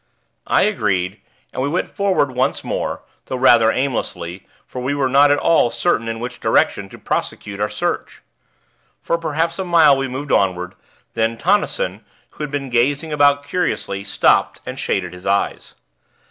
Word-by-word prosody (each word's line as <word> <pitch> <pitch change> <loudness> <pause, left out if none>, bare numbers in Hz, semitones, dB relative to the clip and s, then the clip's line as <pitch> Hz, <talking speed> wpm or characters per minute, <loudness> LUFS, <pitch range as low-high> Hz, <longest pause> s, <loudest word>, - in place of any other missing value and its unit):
I - - +3
agreed, 100 - 0 0.3
and - - -3
we 140 - 0
went 175 +5 -1
forward 190 -9 0
once 130 +2 -1
more, - - -3 0.2
though - - -3
rather 120 -3 +5
aimlessly; 95 -9 -3 0.2
for 125 - -7
we 135 +3 -1
were 140 -2 +1
not 140 +2 +5
at 145 - +4
all 160 -5 +3
certain 115 -5 0
in 115 0 -3
which 125 +1 -6
direction - - +1
to - - -12
prosecute 100 -1 -4
our 105 0 0
search. 105 - -3 0.8
For 170 - 0
perhaps 165 +2 -1
a - - 0
mile 165 -5 +5
we 135 0 -2
moved 135 +3 -5
onward; 90 -1 +1 0.4
then 115 0 0
Tonnison, 210 - 0 0.3
who - - -7
had 150 - -3
been 140 -2 -4
gazing 145 +6 +1
about 145 -1 +4
curiously, 120 - -2
stopped 100 - +2
and - - -6
shaded 90 -2 -2
his 90 +1 -9
eyes. 100 +1 -1
130 Hz, 165 wpm, -19 LUFS, 105-145 Hz, 0.8 s, rather